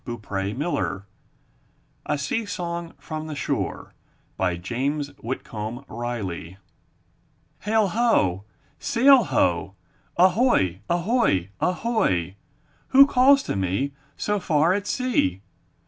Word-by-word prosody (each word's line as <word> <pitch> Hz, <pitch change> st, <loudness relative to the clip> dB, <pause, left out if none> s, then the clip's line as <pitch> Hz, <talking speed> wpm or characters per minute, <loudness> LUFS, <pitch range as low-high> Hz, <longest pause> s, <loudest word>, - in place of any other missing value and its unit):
I -, -, -5 dB
N 100 Hz, -2 st, -4 dB
THE 150 Hz, +5 st, -1 dB
NURSERY 100 Hz, -10 st, -2 dB, 1.0 s
A -, -, 0 dB
SEA 145 Hz, +11 st, -2 dB
SONG 170 Hz, -2 st, -4 dB
FROM 155 Hz, -1 st, -6 dB
THE 155 Hz, -, -5 dB
SHORE* -, -, -3 dB, 0.7 s
James 140 Hz, +9 st, -2 dB
Whitcomb 115 Hz, 0 st, -5 dB
Riley 100 Hz, -7 st, -5 dB, 1.0 s
Hail! 215 Hz, -1 st, +1 dB
Ho! 170 Hz, -, +2 dB, 0.4 s
Sail! 265 Hz, +2 st, +5 dB
Ho! -, -, 0 dB, 0.4 s
Ahoy! 180 Hz, -, +3 dB
Ahoy! 175 Hz, -, +1 dB
Ahoy! 180 Hz, -, 0 dB, 0.5 s
Who 275 Hz, +1 st, +8 dB
calls 275 Hz, +1 st, +5 dB
to -, -, -3 dB
me, 95 Hz, +9 st, -1 dB, 0.3 s
So 210 Hz, 0 st, -1 dB
far 160 Hz, 0 st, +2 dB
at 205 Hz, +1 st, -2 dB
sea? 105 Hz, -, 0 dB
150 Hz, 105 wpm, -24 LUFS, -, 1.0 s, Who